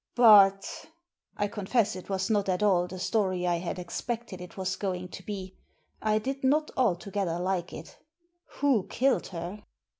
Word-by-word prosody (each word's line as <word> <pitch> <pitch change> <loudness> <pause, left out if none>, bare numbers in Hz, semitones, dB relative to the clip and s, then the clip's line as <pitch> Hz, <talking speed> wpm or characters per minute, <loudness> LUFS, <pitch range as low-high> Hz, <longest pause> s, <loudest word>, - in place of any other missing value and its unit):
"But" 200 -5 +7 0.5
— - - -40
I 205 - +1
confess 210 +2 0
it 185 - -9
was 190 +1 -1
not 205 -2 +1
at 185 +2 0
all 180 -4 +3
the 185 - -8
story 185 -2 0
I 175 -1 +2
had 175 +1 -4
expected 195 +2 -5
it 180 +1 -11
was 190 0 -2
going 180 -2 -3
to 185 - -9
be; 190 -2 -6 0.5
I 215 0 +2
did 270 +5 -3
not 300 +4 +2
altogether 195 -6 0
like 180 0 -2
it— - - -10 0.6
"who 270 -9 +3
killed 265 +2 +1
her?" 180 +4 -7
195 Hz, 170 wpm, -28 LUFS, 180-215 Hz, 0.6 s, But